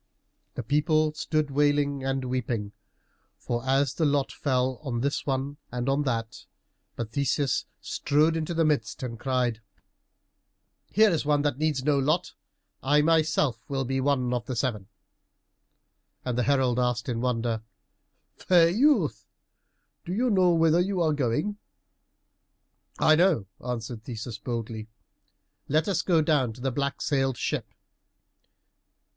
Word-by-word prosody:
The - - -4
people 155 +1 +2
stood 155 -1 -1
wailing 145 -1 +1
and 135 0 -1
weeping 120 -5 -2 0.9
as 135 +1 +2
the 165 - -2
lot 145 -2 +1
fell 130 -2 -1
on 125 -6 -3
this 140 +2 -2
one 135 +1 -2
and 125 0 -3
on 135 +2 +2
that, 115 -3 -3 0.5
but 115 -2 -5
Theseus 140 0 0
strode 150 +3 +1
into 165 +1 -2
the 165 0 +2
midst 150 -3 -1
and 115 -3 -5
cried, 125 -3 -1 1.3
"Here 215 0 +5
is 165 - 0
one 145 -1 +2
who 145 - +2
needs 145 -1 -1
no 145 0 +2
lot. 155 +6 0 0.5
I 145 +2 +3
myself 155 -7 +2
will 135 -1 -1
be 135 +1 -1
one 130 -3 +1
of 120 -3 -3
the 130 - -3
seven." 110 -5 -2 1.4
And 125 -2 -1
the 125 - +1
herald 130 -3 +2
asked 125 -2 0
in 120 -2 -2
wonder, 115 -2 -1 0.8
"Fair 170 -2 +4
youth, 275 - +2 0.8
do 175 - -5
you 245 +2 +1
know 185 -3 +4
whither 165 0 +4
you 190 +1 0
are 160 -3 +2
going?" 150 - -1 1.4
"I 155 - +5
know," 170 - +3 0.2
answered 120 -2 -5
Theseus 115 -2 -6
boldly; 115 -2 -5 0.8
"let 155 +2 +1
us 195 -4 +1
go 165 -4 +2
down 145 -7 +1
to 125 - -13
the 135 +1 -1
black 140 +2 -2
sailed 135 -4 0
ship." - - -3
140 Hz, 140 wpm, -27 LUFS, 125-155 Hz, 1.4 s, Here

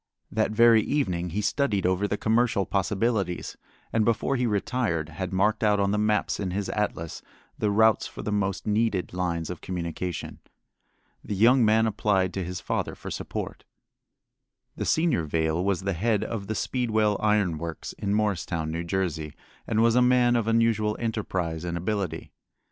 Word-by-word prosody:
That 110 0 +1
very 115 +1 +6
evening 90 -11 -1
he 100 +5 -2
studied 105 -3 0
over 95 +2 +1
the 105 - -1
commercial 110 -3 +2
possibilities, 100 -1 -1 0.4
and 115 - +3
before 115 +4 +1
he 125 -1 +1
retired 100 -6 -1
had 90 +3 -5
marked 105 +4 +1
out 105 -1 +3
on 100 0 +2
the 105 - +1
maps 105 -1 +1
in 95 - -2
his 95 +2 -3
atlas 95 -6 -3 0.4
the 105 - +1
routes 110 +2 +3
for - - -9
the 105 - -2
most 100 -2 -1
needed 105 -4 0
lines 85 -2 -2
of 90 - -7
communication. 90 0 -4 0.8
The 105 - -4
young 120 +5 +5
man 110 +1 +4
applied 100 -4 +1
to 95 - -2
his 90 +1 -5
father - - -2
for - - -8
support. - - -5 1.1
The - - -3
senior 160 - +2
Vail 80 +2 0
was 95 -1 0
the 100 +1 -1
head 105 +4 +1
of 105 -4 -4
the 110 - -2
Speedwell 110 -3 +1
Iron 105 -7 +1
Works 85 -1 -6
at 100 - -3
Morristown, 95 -6 0
New 85 +1 -3
Jersey, 85 -4 -2 0.3
and 110 0 +2
was 115 0 +4
a 125 - +5
man 125 -1 +4
of 115 -2 0
unusual 115 -2 +2
enterprise 95 -8 -2
and 85 -1 -3
ability. 90 -2 -3
105 Hz, 170 wpm, -26 LUFS, 90-110 Hz, 1.1 s, very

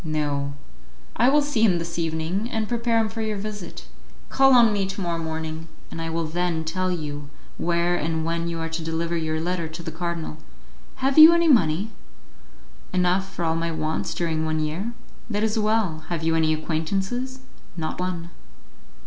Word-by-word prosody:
"No; 145 -3 -1 0.6
I 240 +3 +4
will 295 +1 +4
see 285 -6 -1
him 195 -6 +5
this 170 0 -4
evening, 165 +7 -1
and 220 -3 -1
prepare 235 0 +1
him 225 -1 +3
for 225 +1 -5
your 215 -1 -1
visit. 205 -2 -6 0.4
Call 270 -1 +5
on 230 -3 +6
me 200 -2 0
to 195 +1 -5
morrow 170 -3 -1
morning, 160 0 -4 0.2
and 165 - -5
I 165 - -3
will 165 0 -1
then 170 0 -1
tell 185 +3 -1
you 145 -4 -4 0.3
where 175 +1 +1
and 160 0 -1
when 170 0 -1
you 170 -1 -3
are 165 - -3
to 165 0 -4
deliver 165 +1 -1
your 160 -1 -1
letter 170 0 -1
to 160 +2 -8
the 160 - -5
cardinal. 165 -1 -4 0.7
Have 275 +3 +4
you 315 +2 +11
any 340 0 +3
money?" 205 - +3 1.0
"Enough 185 +1 +1
for 175 - -3
all 160 0 +1
my 165 0 -1
wants 160 -1 -2
during 160 -2 -1
one 155 0 0
year." 165 +10 -2 0.4
"That 210 -1 0
is 220 0 +1
well. 210 -8 +1
Have 170 -2 -2
you 165 0 +2
any 160 -1 +3
acquaintances?" 195 +12 -2 0.4
"Not 160 +1 -3
one." 175 -2 -3
170 Hz, 185 wpm, -24 LUFS, 160-210 Hz, 1.0 s, you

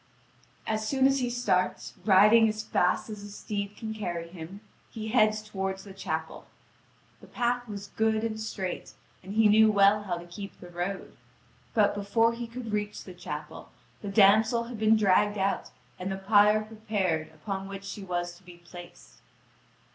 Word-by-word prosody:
And 215 0 0
as 215 - -4
soon 265 +2 +2
as 270 0 +4
he 250 -1 0
starts, 195 -7 0
riding 215 +3 +6
as 215 0 -4
fast 180 -4 +1
as 210 -1 -7
his 205 0 -10
steed 205 -1 -4
can 220 -1 -5
carry 175 -6 -4
him, 180 +3 -9 0.3
he 220 -1 -6
heads 215 -2 +3
toward 195 -2 -3
the 195 0 -11
chapel. 160 -4 -5 0.7
The - - -15
path 245 0 -1
was 200 -2 -7
good 220 0 +1
and 220 -1 -2
straight, 195 -4 -5 0.3
and 195 +3 -8
he 220 -1 +5
knew 215 +1 +6
well 200 0 +5
how 185 -4 -3
to 170 - -9
keep 195 +3 -9
the 175 - -11
road. 175 +3 -4 0.6
But 210 -2 +4
before 225 +3 +2
he 235 0 -5
could 230 -1 -7
reach 210 0 -3
the - - -10
chapel, - - -7 0.3
the 205 - -6
damsel 220 +3 +5
had 235 -1 -8
been 220 0 +4
dragged 205 0 +3
out 195 0 -1 0.3
and 185 +1 -3
the 190 - -3
pyre 210 +2 +4
prepared 210 -7 -2
upon 190 +5 -6
which 195 0 -7
she 200 +1 -7
was 175 -1 -3
to 190 - -23
be 175 -1 -13
placed. 175 - -14
205 Hz, 180 wpm, -28 LUFS, 190-220 Hz, 0.7 s, riding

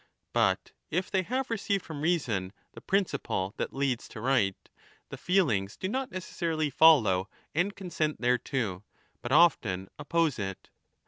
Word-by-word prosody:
But - - +1 0.2
if 180 +4 -1
they 190 - +2
have 255 +6 -2
received 200 -3 -1
from 150 -3 -6
reason 120 - 0 0.2
the - - -12
principle 140 - -1
that - - -2
leads 135 -3 -1
to - - -9
right, 110 -6 +2 0.5
the - - -6
feelings 115 - +1
do 185 - -3
not 265 +6 -2
necessarily 165 -4 -2
follow 120 - +5 0.2
and 185 +5 0
consent 165 -5 -2
thereto, 120 -5 0 0.4
but 120 - -5
often 110 - +3
oppose 155 -2 +1
it. 95 -1 -5
145 Hz, 140 wpm, -29 LUFS, 105-180 Hz, 0.5 s, follow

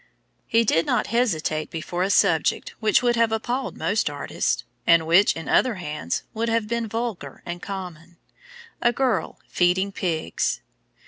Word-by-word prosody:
He 230 +1 +3
did 165 -5 +2
not - - +1
hesitate 160 -10 0
before 170 +2 -4
a 190 - +1
subject - - +2
which 220 +2 +3
would 240 -1 +3
have 230 -1 +3
appalled 240 +4 -2
most 205 -4 0
artists, 145 -1 -2 0.2
and 170 -1 +5
which, 175 +5 +5
in 165 -3 -7
other 250 -4 +3
hands, 150 - -4
would 230 +1 -1
have 225 -2 0
been 235 0 -1
vulgar 225 -2 -5
and 175 0 -5
common, 175 -4 -7 0.6
A 240 - +4
Girl 255 -1 -1
Feeding 185 +2 +1
Pigs. 170 -5 -1
195 Hz, 150 wpm, -24 LUFS, 170-230 Hz, 0.6 s, and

